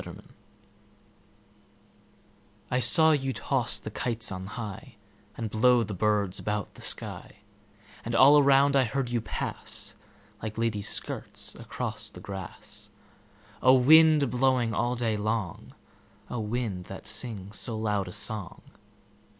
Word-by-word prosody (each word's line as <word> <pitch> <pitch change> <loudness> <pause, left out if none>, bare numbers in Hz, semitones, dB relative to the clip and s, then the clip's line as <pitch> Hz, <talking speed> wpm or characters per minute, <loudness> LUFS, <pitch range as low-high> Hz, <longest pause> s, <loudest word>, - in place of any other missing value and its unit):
The - - -9
Wind - - -12 2.4
I 125 - +2
SAW 160 +5 +6
you 135 -3 0
toss 125 +1 -1
the 110 - -7
kites 115 0 -1
on 95 0 -5
highAnd 105 -1 -8
blow 120 +2 +4
the 105 -1 -5
birds 100 -1 +1
about 105 -1 -3
the - - -15
sky; - - -4 0.7
And 115 +1 -3
all 140 +4 +8
around 140 0 +5
I 135 - +5
heard 125 +2 -2
you 120 -1 0
pass, - - -5 0.5
Like 110 0 -5
ladies' 110 -2 -1
skirts - - -3
across - - -5
the - - -12
grass—O 100 +6 -3
wind, 155 +3 +7
a - - +1
blowing 125 -1 +1
all 120 +4 0
day 115 -3 0
long,O 110 +3 -6
wind, 105 -4 -3
that 95 +2 -9
sings 110 -2 -3
so 115 -3 -3
loud 105 -3 -1
a - - -6
song! 105 0 -5
115 Hz, 130 wpm, -28 LUFS, 105-125 Hz, 2.4 s, all